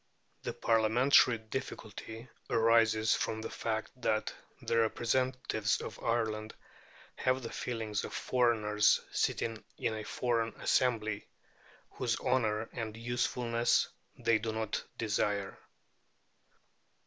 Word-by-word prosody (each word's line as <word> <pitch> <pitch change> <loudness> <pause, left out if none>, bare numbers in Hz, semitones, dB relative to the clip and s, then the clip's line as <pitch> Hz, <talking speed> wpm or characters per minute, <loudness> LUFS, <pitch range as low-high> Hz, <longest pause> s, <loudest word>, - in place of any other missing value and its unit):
The - - -4
Parliamentary 115 +2 +4
difficulty 110 -1 -7 0.2
arises 115 -1 +4
from 110 - -1
the 110 - -5
fact 110 -1 -2
that 110 -1 0 0.3
the 115 - +1
representatives 120 -1 +1
of 105 - -8
Ireland 110 -2 -1 0.6
have 130 0 +1
the 115 - -5
feelings 110 -4 -3
of - - -5
foreigners 110 -4 +3
sitting 115 -1 -1
in - - -1
a 110 0 -4
foreign 115 -1 -1
assembly, 110 -5 +1 0.6
whose 120 -3 -1
honour 115 -4 +1
and 110 -2 -4
usefulness 120 0 +1 0.3
they 115 -2 +2
do 110 +1 -2
not 110 -1 -2
desire. 105 -2 0
115 Hz, 105 wpm, -32 LUFS, 110-120 Hz, 0.6 s, Parliamentary